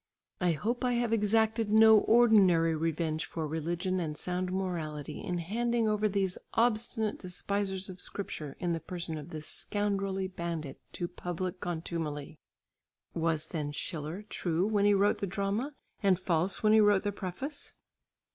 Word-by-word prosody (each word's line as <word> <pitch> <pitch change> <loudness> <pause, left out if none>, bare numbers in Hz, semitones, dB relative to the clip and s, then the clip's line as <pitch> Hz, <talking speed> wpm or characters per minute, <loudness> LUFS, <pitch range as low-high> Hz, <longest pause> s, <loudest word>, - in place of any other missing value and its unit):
I 180 -2 +2
hope 235 - -2
I 250 -1 +2
have 235 -1 +1
exacted 220 +1 +2
no 220 0 +8
ordinary 195 -9 +5
revenge 160 0 -1
for 160 -2 -4
religion 170 +4 -1
and 155 -3 -3
sound 180 +2 -1
morality 160 -6 -3
in 180 - -2
handing 230 +6 0
over 215 0 +2
these 195 -2 0 0.2
obstinate 225 -1 +1
despisers 190 +1 -2
of 185 -1 -7
Scripture 155 -7 -5
in 175 -2 0
the 165 - -1
person 170 -1 -5
of 150 +2 -9
this 155 -2 -7
scoundrelly 195 -1 -1
bandit, 170 -6 -5
to 175 - -2
public 180 +1 -4
contumely. 160 -3 -4 0.7
Was 160 -2 0
then 150 -4 -3
Schiller 155 +5 -4
true 175 -2 0
when 205 -1 +2
he 205 0 +5
wrote 200 +1 +3
the 200 - -2
drama, 200 +9 -2 0.3
and 195 -3 +4
false 180 +2 0
when 215 0 +5
he 220 - +7
wrote 205 -2 +4
the 205 - 0
preface? 205 - -6
185 Hz, 155 wpm, -31 LUFS, 165-210 Hz, 0.7 s, no